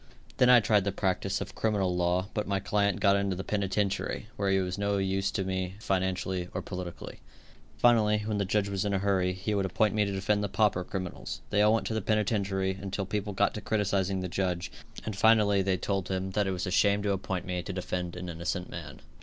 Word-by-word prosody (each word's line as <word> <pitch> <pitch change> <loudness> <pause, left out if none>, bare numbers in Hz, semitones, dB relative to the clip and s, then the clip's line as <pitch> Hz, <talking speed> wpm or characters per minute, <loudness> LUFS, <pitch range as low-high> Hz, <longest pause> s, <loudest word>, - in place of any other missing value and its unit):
Then 125 - +5
I 125 -1 +8
tried 105 -2 +3
the 100 - 0
practice 95 -1 -1
of - - -6
criminal 100 -5 0
law, 90 +2 +1
but 105 -1 -2
my 100 -1 0
client 100 0 +1
got 100 -1 +4
into 100 -1 0
the 95 - -4
penitentiary, 100 +1 -1
where 100 -5 0
he 95 - +3
was 90 0 -2
no 100 0 +1
use 95 0 0
to 95 - -1
me 95 0 -3
financially 95 -2 -1
or - - -2
politically. 90 -2 -7 0.6
Finally, 105 -2 +4
when 105 -1 -1
the - - +2
judge 100 +1 +1
was 100 -2 -1
in 100 -1 0
a - - +3
hurry, 95 -2 +1
he 95 +4 -3
would 100 -2 +1
appoint 105 +2 +1
me 105 -1 +2
to 100 - -1
defend 100 +2 0
the 100 - -1
pauper 105 -3 +2
criminals. 95 -1 -5
They 105 - +3
all 105 +1 +5
went 115 - -1
to - - -2
the 110 - -1
penitentiary, 100 -2 0
until 100 0 -3
people 105 +1 -3
got 100 +1 +2
to 105 - -5
criticising 100 -2 0
the 90 - -2
judge, 90 -1 -2 0.3
and 110 - -3
finally 100 -1 +4
they 95 -1 +1
told 95 0 -2
him 95 0 -2
that 105 0 +1
it - - 0
was 90 +1 -2
a 90 - -3
shame 100 +2 +3
to 100 - +1
appoint 95 -2 -2
me 90 -1 -2
to 95 - -6
defend 90 -1 -3
an 90 0 -6
innocent 85 +2 -3
man. 75 -6 -8
95 Hz, 230 wpm, -29 LUFS, 95-105 Hz, 0.6 s, I